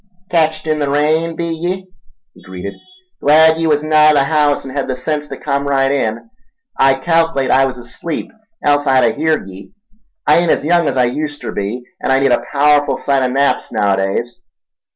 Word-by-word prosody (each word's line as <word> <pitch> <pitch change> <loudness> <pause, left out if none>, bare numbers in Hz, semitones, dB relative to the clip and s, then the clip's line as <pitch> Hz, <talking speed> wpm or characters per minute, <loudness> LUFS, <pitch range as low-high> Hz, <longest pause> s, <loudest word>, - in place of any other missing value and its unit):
"Ketched 160 -2 +1
in 155 -1 -1
the 145 -1 -1
rain, 155 +3 +1
be 170 +1 -3
ye?" 175 +3 -3 0.5
he - - -19
greeted. 95 +2 -8 0.5
"Glad 160 +2 +5
ye 165 - 0
was 150 -1 +1
nigh 155 0 +4
the 145 - +3
haouse 145 -1 +1
en' 135 0 -8
hed 140 - -2
the 130 - -2
sense 150 +3 -3
ta - - -7
come 140 -1 -2
right 135 -1 +1
in. 115 - -2 0.5
I 135 0 +3
calc'late 165 -2 0
I 135 +1 +4
was 130 - -6
asleep, 125 +7 -6 0.3
else 145 0 +2
I'd 130 -1 +4
a - - +2
heerd 155 -6 -1
ye—I 205 - -4
ain't 175 -1 0
as 145 - +1
young 170 -1 +2
as 130 - -3
I 125 - +4
uster 145 +2 -5
be, 105 +5 -4 0.2
an' - - -1
I 135 - +4
need 135 -1 +2
a 120 - +1
paowerful 145 0 +2
sight 140 -1 0
o' 130 - +1
naps 135 +2 0
naowadays. 100 +2 -1
145 Hz, 195 wpm, -16 LUFS, 130-160 Hz, 0.5 s, Glad